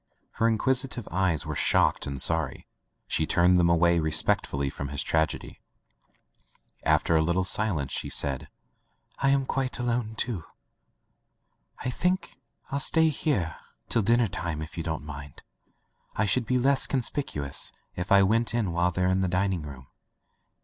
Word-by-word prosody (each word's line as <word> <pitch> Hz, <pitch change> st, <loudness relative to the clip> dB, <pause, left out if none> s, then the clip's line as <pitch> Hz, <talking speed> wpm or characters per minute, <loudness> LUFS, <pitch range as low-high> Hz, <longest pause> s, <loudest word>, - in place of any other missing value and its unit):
Her 115 Hz, -, +1 dB
inquisitive 125 Hz, +1 st, 0 dB
eyes 90 Hz, -3 st, +1 dB
were -, -, -4 dB
shocked -, -, +2 dB
and 70 Hz, -1 st, -4 dB
sorry. 80 Hz, -4 st, 0 dB, 0.4 s
She 80 Hz, -, 0 dB
turned 90 Hz, +1 st, +4 dB
diem 85 Hz, -1 st, +4 dB
away 85 Hz, 0 st, +4 dB
respectfully 80 Hz, -3 st, +1 dB
from 70 Hz, -, -5 dB
his 70 Hz, 0 st, -2 dB
tragedy. 80 Hz, -1 st, -1 dB, 1.2 s
After 85 Hz, -, +2 dB
a 80 Hz, -, +4 dB
litde 85 Hz, +3 st, +1 dB
silence 90 Hz, -9 st, +1 dB
she -, -, -3 dB
said: 70 Hz, -3 st, -2 dB, 0.7 s
"I 140 Hz, -, +2 dB
am 135 Hz, -1 st, +2 dB
quite 135 Hz, -1 st, -2 dB
alone, 120 Hz, -3 st, -2 dB
too.... 110 Hz, -7 st, -2 dB, 1.4 s
"I 125 Hz, -, -1 dB
think 180 Hz, 0 st, -1 dB, 0.3 s
ril 140 Hz, -, 0 dB
stay 160 Hz, +2 st, +3 dB
here 130 Hz, -, -1 dB, 0.3 s
till 115 Hz, -, +3 dB
dinner 115 Hz, +3 st, +3 dB
time, 85 Hz, -4 st, -4 dB
if 80 Hz, -, -10 dB
you 85 Hz, -, -3 dB
don't 80 Hz, -3 st, -4 dB
mind. 70 Hz, -1 st, -9 dB, 0.7 s
I 110 Hz, -, +1 dB
should 115 Hz, +4 st, +1 dB
be 125 Hz, -, +2 dB
less 135 Hz, +2 st, +3 dB
conspicu 130 Hz, -, -2 dB
ous 70 Hz, -, +1 dB, 0.2 s
if 90 Hz, +1 st, -5 dB
I 100 Hz, 0 st, +7 dB
went 115 Hz, +3 st, +1 dB
in 110 Hz, -7 st, 0 dB
while 85 Hz, +1 st, +2 dB
they're 90 Hz, +1 st, -1 dB
in 95 Hz, +1 st, +1 dB
the 95 Hz, -, +1 dB
dining 90 Hz, 0 st, 0 dB
room. 70 Hz, -3 st, -9 dB
95 Hz, 155 wpm, -27 LUFS, 80-120 Hz, 1.4 s, I